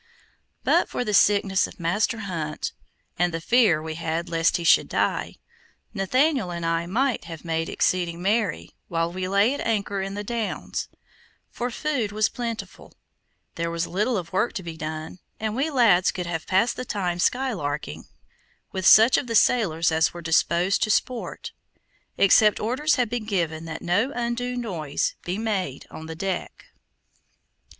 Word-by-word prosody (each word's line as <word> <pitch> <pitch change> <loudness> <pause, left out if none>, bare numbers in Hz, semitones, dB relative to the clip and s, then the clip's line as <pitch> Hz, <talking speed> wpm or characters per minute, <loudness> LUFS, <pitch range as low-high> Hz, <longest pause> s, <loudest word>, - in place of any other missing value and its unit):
But - - +3
for 245 - -2
the 210 - -2
sickness 200 -2 +4
of - - -15
Master 205 +7 0
Hunt, 165 -6 -4 0.5
and 175 0 +2
the 165 - -3
fear 210 -3 +4
we 160 0 -4
had 165 +1 -3
lest 165 +2 +2
he 170 - -5
should 165 - +5
die, - - -1 0.6
Nathaniel 255 - +1
and 170 -1 -4
I 165 +1 0
might 250 +5 0
have 165 -1 -9
made 165 0 -1
exceeding 175 -2 0
merry 190 - 0 0.2
while 165 0 -1
we 185 0 -3
lay 200 +6 +3
at 285 - -5
anchor 205 -3 -1
in 195 +1 -4
the 205 - -4
Downs, 230 0 -3 0.6
for 245 +1 -3
food 250 -5 -2
was 215 +1 +1
plentiful; 230 -2 -6 0.6
there 170 0 -2
was 170 0 -2
little 210 +7 0
of 175 -1 -6
work 200 +6 +1
to 190 - -5
be 165 -1 -6
done, 155 +2 -6 0.2
and 220 0 -2
we 275 +5 0
lads 225 - +4
could 180 - -3
have 165 -2 -4
passed 220 +5 +2
the - - -3
time 180 -7 -2
skylarking 180 - -1 0.7
with 190 -1 0
such 225 +4 +7
of 255 - -6
the 230 - -2
sailors 170 -10 +3
as 160 +1 +2
were 175 - -6
disposed 170 +3 +2
to 215 - +1
sport, 245 +3 -1 0.7
except 210 +2 +5
orders 265 +8 +1
had 250 -3 +1
been 235 0 -4
given 165 -6 -2
that 165 0 -6
no 205 +10 +1
undue 245 +1 -2
noise 170 -12 -2
be 180 +2 -3
made 195 - -2
on 160 - -9
deck. 175 +3 -4
190 Hz, 165 wpm, -24 LUFS, 170-230 Hz, 0.7 s, such